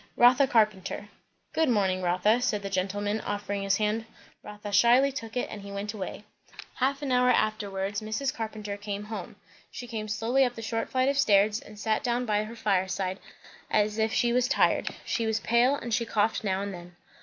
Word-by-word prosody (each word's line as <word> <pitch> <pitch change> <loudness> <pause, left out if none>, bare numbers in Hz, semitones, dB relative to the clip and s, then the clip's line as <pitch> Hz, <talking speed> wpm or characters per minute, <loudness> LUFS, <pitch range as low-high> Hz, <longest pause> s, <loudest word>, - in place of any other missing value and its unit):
"Rotha 250 +3 +6
Carpenter." 210 -4 +1 0.4
"Good 320 -3 +2
morning, 190 -5 +1
Rotha," 185 +7 +2
said 210 -5 0
the 195 - -5
gentleman, 205 +3 -1
offering 205 -1 -3
his 195 0 +1
hand. 215 +1 0 0.4
Rotha 210 0 -8
shyly 240 +6 +5
took 225 -3 -6
it, 245 - 0
and 210 - -7
he 200 0 -9
went 200 +1 -4
away. 205 0 -6 0.5
Half 275 +3 -1
an 275 - -2
hour 250 0 +4
afterwards, 205 -3 0
Mrs. 220 +6 -2
Carpenter 215 -2 -5
came 205 0 -5
home. 215 +1 -7 0.3
She 245 - -8
came 220 -3 -5
slowly 225 +6 +1
up 245 -2 0
the 225 - -7
short 225 0 -2
flight 255 0 +1
of 280 0 0
stairs, 210 -1 +4
and 210 - -13
sat 215 +1 0
down 245 0 0
by 210 -1 +1
her 225 +2 -9
fireside 190 -3 -1 0.5
as 210 +1 +1
if 220 0 +2
she 240 -1 +2
was 250 0 +2
tired. - - +2 0.2
She 230 -2 -1
was 220 0 0
pale, 240 +5 +3
and 240 -4 -5
she 235 - +2
coughed 220 -1 0
now 195 -1 0
and 200 -1 -4
then. 175 0 -11
215 Hz, 195 wpm, -28 LUFS, 200-235 Hz, 0.5 s, Rotha